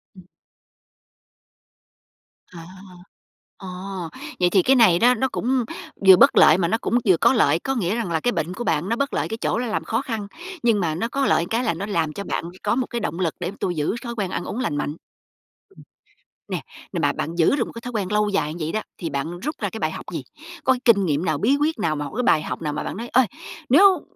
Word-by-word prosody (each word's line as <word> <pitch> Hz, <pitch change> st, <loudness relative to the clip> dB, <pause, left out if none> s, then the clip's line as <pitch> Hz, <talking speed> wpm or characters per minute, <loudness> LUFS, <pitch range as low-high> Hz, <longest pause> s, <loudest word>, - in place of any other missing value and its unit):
Ừm. 185 Hz, -, -14 dB, 2.2 s
À. 170 Hz, -3 st, -11 dB, 0.9 s
Ờ, 190 Hz, -, -10 dB, 0.7 s
vậy 180 Hz, -1 st, +4 dB
thì 190 Hz, +1 st, +4 dB
cái 265 Hz, +8 st, +4 dB
này 215 Hz, -9 st, +5 dB
đó 245 Hz, +2 st, +5 dB
nó 250 Hz, +2 st, 0 dB
cũng 255 Hz, 0 st, 0 dB, 0.4 s
vừa 190 Hz, -, +11 dB
bất -, -, +5 dB
lợi 155 Hz, -, +7 dB
mà 175 Hz, -2 st, +1 dB
nó 200 Hz, -, +1 dB
cũng 240 Hz, -, +1 dB
vừa 185 Hz, -3 st, +5 dB
có -, -, +4 dB
lợi. 160 Hz, -, +3 dB
Có 270 Hz, +8 st, -2 dB
nghĩa 200 Hz, -4 st, 0 dB
rằng 230 Hz, -7 st, -3 dB
là 160 Hz, -, +1 dB
cái 245 Hz, -, 0 dB
bệnh 175 Hz, -5 st, -2 dB
của 240 Hz, -, -5 dB
bạn 165 Hz, -2 st, 0 dB
nó 230 Hz, -, +1 dB
bất 280 Hz, +3 st, -2 dB
lợi -, -, 0 dB
cái 225 Hz, -, -3 dB
chỗ -, -, 0 dB
là 245 Hz, +1 st, -2 dB
làm 215 Hz, -, -2 dB
khó 225 Hz, +2 st, -1 dB
khăn, 225 Hz, -6 st, -4 dB, 0.4 s
nhưng 230 Hz, -3 st, +3 dB
mà 165 Hz, -5 st, -1 dB
nó 190 Hz, +8 st, -1 dB
có 275 Hz, +3 st, -1 dB
lợi -, -, +3 dB
một 175 Hz, -, -8 dB
cái, 230 Hz, +2 st, 0 dB
là 225 Hz, -, +1 dB
nó 175 Hz, +5 st, -5 dB
làm 165 Hz, -7 st, -1 dB
cho 200 Hz, -, -5 dB
bạn -, -, -3 dB, 0.2 s
có -, -, +1 dB
một 255 Hz, 0 st, -1 dB
cái 240 Hz, -, -3 dB
động 185 Hz, -4 st, -3 dB
lực, 170 Hz, -4 st, -1 dB
để 180 Hz, 0 st, -3 dB
tôi 180 Hz, -, -1 dB
giữ 150 Hz, +6 st, -1 dB
thói 235 Hz, -1 st, -6 dB
quen 200 Hz, -5 st, -2 dB
ăn 175 Hz, -, -3 dB
uống 230 Hz, -, -4 dB
lành 225 Hz, -, -1 dB
mạnh. 145 Hz, 0 st, -2 dB, 0.7 s
Ừm, -, -, -17 dB, 0.7 s
nè -, -, -3 dB, 0.3 s
nè -, -, -1 dB
mà -, -, +2 dB
bạn 165 Hz, -, -4 dB
giữ 170 Hz, +9 st, +3 dB
được 245 Hz, -5 st, 0 dB
một -, -, -9 dB
cái 230 Hz, -, -8 dB
thói 245 Hz, +1 st, -7 dB
quen 205 Hz, -3 st, -2 dB
lâu 210 Hz, 0 st, +2 dB
dài 155 Hz, -7 st, -1 dB
như 165 Hz, -2 st, -4 dB
vậy 160 Hz, -, -3 dB
đó, 215 Hz, -, -1 dB, 0.2 s
thì 170 Hz, -, -4 dB
bạn 155 Hz, +5 st, -4 dB
rút 300 Hz, -, -4 dB
ra -, -, -1 dB
cái -, -, -7 dB
bài -, -, -1 dB
học -, -, -8 dB
gì? -, -, -4 dB, 0.4 s
Có 260 Hz, -, +4 dB
cái 255 Hz, -, -4 dB
kinh 200 Hz, -5 st, +5 dB
nghiệm 155 Hz, +1 st, 0 dB
nào? 155 Hz, -3 st, 0 dB
Bí 240 Hz, -, +2 dB
quyết 310 Hz, -3 st, 0 dB
nào? 160 Hz, -6 st, 0 dB
Một 145 Hz, -1 st, -4 dB
cái 250 Hz, -, 0 dB
bài 155 Hz, -, +4 dB
học -, -, -5 dB
nào? 150 Hz, -2 st, -2 dB
Mà -, -, -3 dB
bạn -, -, -5 dB
nói: 235 Hz, +2 st, -5 dB
"Ơi, 255 Hz, +1 st, +4 dB, 0.4 s
nếu 375 Hz, +8 st, +6 dB
200 Hz, 260 wpm, -23 LUFS, 170-240 Hz, 2.2 s, vừa